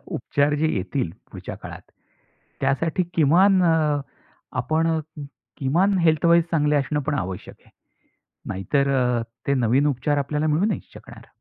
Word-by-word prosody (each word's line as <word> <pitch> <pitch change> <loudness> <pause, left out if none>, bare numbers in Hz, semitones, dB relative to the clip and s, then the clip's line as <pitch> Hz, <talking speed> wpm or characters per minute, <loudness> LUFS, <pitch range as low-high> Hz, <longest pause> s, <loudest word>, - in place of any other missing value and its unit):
उपचार 145 +1 0
जे 160 - +2
येतील 95 +1 -2 0.2
पुढच्या - - -7
काळात, - - -10 0.8
त्यासाठी 155 +7 0
किमान 180 +5 +4
अ, 155 -3 +2 0.6
आपण 160 +1 +1 0.7
किमान 180 +9 +2
हेल्थ 160 -2 +2
वाईज 170 0 +5
चांगले 150 -2 +2
असणं 145 +1 0
पण 150 - 0
आवश्यक 95 -7 -5
आहे. - - -23 0.8
नाहीतर 140 +9 0
अ, 125 -2 +1 0.2
ते 140 - +2
नवीन 130 +3 +2
उपचार 145 +1 0
आपल्याला 150 +2 -1
मिळू 155 +5 +2
नाही 215 - 0
शकणार. - - -13
150 Hz, 135 wpm, -23 LUFS, 135-165 Hz, 0.8 s, वाईज